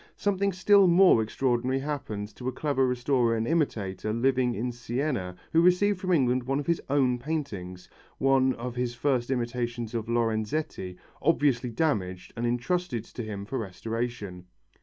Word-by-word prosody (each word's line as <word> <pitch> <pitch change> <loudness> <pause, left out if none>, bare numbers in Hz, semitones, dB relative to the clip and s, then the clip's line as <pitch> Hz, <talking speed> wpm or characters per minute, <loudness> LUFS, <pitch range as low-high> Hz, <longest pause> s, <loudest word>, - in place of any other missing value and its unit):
Something 200 0 +1
still 195 +1 +5
more 180 -8 +6
extraordinary 125 +3 0
happened 135 -8 -4
to 125 - -7
a - - +1
clever 135 0 0
restorer 125 -2 +1
and 110 +1 -1
imitator 110 - -1
living 125 +1 +1
in 125 +4 -2
Siena 120 -5 -3 0.2
who 165 - +5
received 180 +3 +3
from 185 0 -2
England 130 -6 +3
one 135 +3 -1
of 145 - -4
his 170 -1 0
own 130 -3 +2
paintings 110 - -5 0.3
one 135 -1 +3
of 120 0 -6
his 125 -1 -2
first 125 -1 0
imitations 120 -2 -2
of 115 -1 -3
Lorenzetti 110 -3 -1 0.2
obviously 140 -6 +2
damaged 105 - -1
and 120 +1 -1
entrusted 125 +1 -1
to - - -8
him 105 -3 -5
for 130 +5 -3
restoration. 105 -2 -5
125 Hz, 155 wpm, -27 LUFS, 115-145 Hz, 0.3 s, more